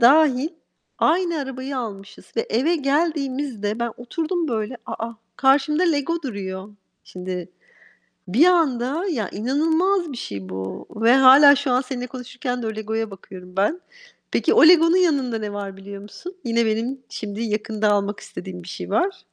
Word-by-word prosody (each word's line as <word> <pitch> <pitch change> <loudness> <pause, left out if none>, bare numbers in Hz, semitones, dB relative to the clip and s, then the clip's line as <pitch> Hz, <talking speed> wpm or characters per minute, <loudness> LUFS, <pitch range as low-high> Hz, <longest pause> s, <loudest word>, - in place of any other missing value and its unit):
dâhil 275 +2 +5 0.5
aynı 340 0 +2
arabayı 270 -1 -4
almışız 205 -4 -7
ve 230 - +3
eve 305 +10 +2
geldiğimizde 275 -7 -1
ben 235 -1 -1
oturdum 320 +6 -2
böyle, 225 +1 -2
a, - - -6 0.2
a, 230 - -12 0.2
karşımda 285 +5 +3
Lego 335 0 0
duruyor. 195 -6 -5 0.4
Şimdi 180 -1 -6 0.8
bir 260 - +5
anda, 305 -2 +2
ya, 220 -8 -2
inanılmaz 320 - +1
bir - - -7
şey 100 - -6
bu 95 0 -6
ve 230 +3 +3
hâlâ 275 +2 +8
şu 285 -1 -1
an 250 - +3
seninle 255 -1 -5
konuşurken 250 0 -5
de - - -3
o 220 - -3
Lego'ya 220 0 -3
bakıyorum 185 -1 -12
ben. 210 - +1 0.5
Peki - - +2
o - - +7
Lego'nun 335 0 +6
yanında 280 -10 +2
ne 210 -1 -5
var 200 -1 -6
biliyor 195 +1 -9
musun? 350 - -10
Yine 235 -1 +1
benim 230 +5 -1
şimdi 210 +1 -5
yakında 215 -1 0
almak 205 0 0
istediğim 180 -2 -8
bir 175 - -12
şey - - -7
var. 370 +1 0
250 Hz, 160 wpm, -22 LUFS, 210-295 Hz, 0.8 s, hâlâ